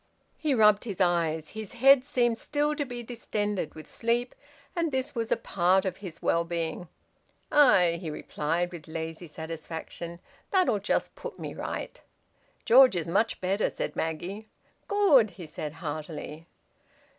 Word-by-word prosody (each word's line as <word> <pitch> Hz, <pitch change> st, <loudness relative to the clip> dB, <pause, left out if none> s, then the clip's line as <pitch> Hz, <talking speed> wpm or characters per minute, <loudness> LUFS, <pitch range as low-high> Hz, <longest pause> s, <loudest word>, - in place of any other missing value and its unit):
He 300 Hz, -4 st, +1 dB
rubbed 210 Hz, -1 st, +5 dB
his 200 Hz, -6 st, -5 dB
eyes. 165 Hz, -3 st, +1 dB
His 220 Hz, -1 st, -7 dB
head 265 Hz, +2 st, +6 dB
seemed 245 Hz, -5 st, +1 dB
still 295 Hz, 0 st, 0 dB
to 290 Hz, -1 st, -2 dB
be 245 Hz, -2 st, -6 dB
distended 210 Hz, -6 st, -3 dB
with 155 Hz, -, -10 dB
sleep, 240 Hz, +1 st, -1 dB, 0.4 s
and 335 Hz, -3 st, 0 dB
this 265 Hz, +1 st, -2 dB
was 230 Hz, -2 st, -3 dB
a -, -, +3 dB
part 185 Hz, +1 st, +2 dB
of 185 Hz, -1 st, -2 dB
his 180 Hz, -5 st, -9 dB
well 170 Hz, -, +2 dB
being. 170 Hz, +1 st, -3 dB, 0.6 s
"Aye!" 180 Hz, -13 st, +5 dB
he 165 Hz, -, -4 dB
replied, 165 Hz, +3 st, -2 dB
with 170 Hz, -4 st, -10 dB
lazy 160 Hz, +1 st, -5 dB
satisfaction. 165 Hz, +2 st, -7 dB, 0.3 s
"That'll 370 Hz, -, +3 dB
just 200 Hz, -, -1 dB
put -, -, -8 dB
me -, -, -6 dB
right." -, -, -5 dB, 0.6 s
"George 255 Hz, -2 st, +7 dB
is 170 Hz, -2 st, -1 dB
much 210 Hz, +7 st, +1 dB
better," 195 Hz, +3 st, +1 dB
said -, -, -4 dB
Maggie. 180 Hz, +7 st, -4 dB, 0.4 s
"Good!" 345 Hz, -, +5 dB
he 175 Hz, -, -7 dB
said 150 Hz, -1 st, -6 dB
heartily. 155 Hz, +1 st, -6 dB
190 Hz, 150 wpm, -28 LUFS, 165-240 Hz, 0.6 s, George